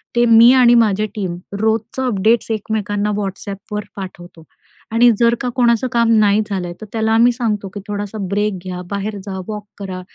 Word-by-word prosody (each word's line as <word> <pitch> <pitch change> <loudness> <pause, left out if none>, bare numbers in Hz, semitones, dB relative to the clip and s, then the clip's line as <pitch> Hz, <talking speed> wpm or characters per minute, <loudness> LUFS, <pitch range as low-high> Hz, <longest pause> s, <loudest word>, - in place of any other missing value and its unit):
ते 240 0 +4
मी 230 +1 +7
आणि 250 -2 +6
माझ्या 215 -3 +3
टीम 190 -5 -3 0.2
रोजचं 220 +4 -1
अपडेट्स 220 +1 +1
एकमेकांना 210 -1 -2
WhatsAppवर 200 +1 -5
पाठवतो 175 -3 -9 0.5
आणि 235 +2 +5
जर 235 0 +4
का 250 - -1
कोणाचं 240 -1 +2
काम 235 -1 +2
नाही 205 0 +3
झालंय 180 -3 -3
तर - - -6
त्याला 220 -1 0
आम्ही 235 +2 +5
सांगतो, 215 -4 -2
की 205 - -8
"थोडासा 205 +1 -5
ब्रेक 205 0 -1
घ्या, 180 -1 -5
बाहेर 200 +1 -3
जा, 190 -2 -5
वॉक 210 -1 -6
करा." 190 -2 -6
210 Hz, 170 wpm, -18 LUFS, 200-230 Hz, 0.5 s, मी